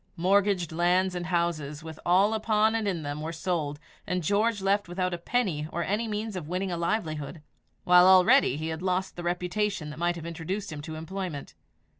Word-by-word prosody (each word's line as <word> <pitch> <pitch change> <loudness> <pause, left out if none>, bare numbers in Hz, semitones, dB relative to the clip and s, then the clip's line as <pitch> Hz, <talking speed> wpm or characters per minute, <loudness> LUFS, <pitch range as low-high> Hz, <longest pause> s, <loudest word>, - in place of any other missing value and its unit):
Mortgaged 190 -1 +2
land 180 +3 +2
and 175 -1 -4
houses, 165 -4 -1
with 160 -1 -9
all 195 +5 +4
upon 220 0 +2
and 225 -2 -1
in 175 -5 -2
them, 145 +1 -4
were 160 +1 -4
sold, 160 -4 -2 0.3
and 180 -1 -1
George 205 +5 +1
left 195 +1 +1
without 180 +1 -2
a - - -2
penny 170 -7 -1
or 170 - -2
any 210 +6 -1
means 215 0 -3
of 170 -5 -5
winning 185 +2 -2
a - - -1
livelihood, 165 -4 -3 0.4
while 180 0 +7
already 190 - +6
he 160 +1 -3
had 160 +1 -4
lost 185 0 -1
the 175 - -6
reputation 180 -1 -2
that 150 - -10
might 175 0 +1
have 165 -1 -8
introduced 170 +4 -4
him 145 - -6
to 155 +1 -7
employment. 165 -2 -5
180 Hz, 195 wpm, -27 LUFS, 160-195 Hz, 0.4 s, while